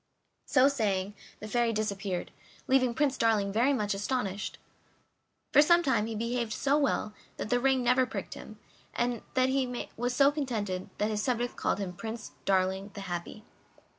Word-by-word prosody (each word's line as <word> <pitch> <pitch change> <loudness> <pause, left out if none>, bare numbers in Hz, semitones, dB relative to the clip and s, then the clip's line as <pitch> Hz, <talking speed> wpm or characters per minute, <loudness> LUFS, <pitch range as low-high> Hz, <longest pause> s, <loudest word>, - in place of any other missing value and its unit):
So 265 -1 +5
saying, 205 -7 0 0.3
the 215 - -6
Fairy 235 +1 +1
disappeared, 200 -4 -2 0.4
leaving 255 -2 +3
Prince 275 -1 +1
Darling 210 -3 +2
very 240 +6 +3
much 210 -6 0
astonished. 205 -1 -2 1.0
For 290 - +8
some 345 +3 +5
time 260 -7 +1
he 225 - -4
behaved 235 0 -2
so 280 +5 +1
well 275 -7 +1 0.2
that 215 - -4
the 245 - +3
ring 265 0 +2
never 250 +1 +3
pricked 265 - -5
him, - - -10 0.4
and 240 -1 0
that 255 0 +3
made 255 -2 -1
him 245 +2 -1
so 275 +3 +4
contented 215 -11 -3
that 210 +1 0
his 210 -1 -1
subjects 245 0 -1
called - - -1
him 195 -3 -4
Prince 220 +4 -6
Darling 190 +1 +1
the 200 - -6
Happy. 180 +3 -5
230 Hz, 165 wpm, -30 LUFS, 205-260 Hz, 1.0 s, For